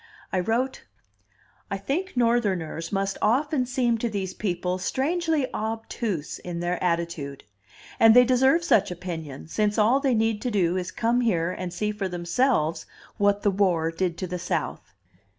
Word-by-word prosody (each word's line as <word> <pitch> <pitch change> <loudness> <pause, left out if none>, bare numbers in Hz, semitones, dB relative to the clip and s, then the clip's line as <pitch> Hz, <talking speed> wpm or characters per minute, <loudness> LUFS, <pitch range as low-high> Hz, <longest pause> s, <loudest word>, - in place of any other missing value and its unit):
I 185 - +2
wrote: 235 +8 -1 0.9
"I 200 - -2
think 275 - -3
Northerners 195 -9 0
must 195 -1 -1
often 260 +3 +2
seem 245 -3 +1
to 235 - -1
these 195 -3 -3
people 180 -2 -2
strangely 315 - 0
obtuse 220 -6 -3
in 175 -1 -5
their 175 +1 -2
attitude. 170 -5 -2 0.6
And 225 0 +7
they 250 0 +8
deserve 265 +6 +3
such 205 - +3
opinion, 165 -6 -6
since 210 +4 0
all 225 +5 +4
they 270 -3 +1
need 220 -1 +1
to 250 - -1
do 185 -5 +1
is 185 -1 -2
come 235 +2 +1
here 180 -7 +1
and 180 -1 -5
see 210 +4 -1
for 205 -2 -3
themselves 175 - 0 0.3
what 205 0 +2
the 205 - +3
War 180 -5 +1
did 170 0 -2
to 185 - -3
the 180 0 -4
South. - - -3
205 Hz, 160 wpm, -25 LUFS, 175-240 Hz, 0.9 s, they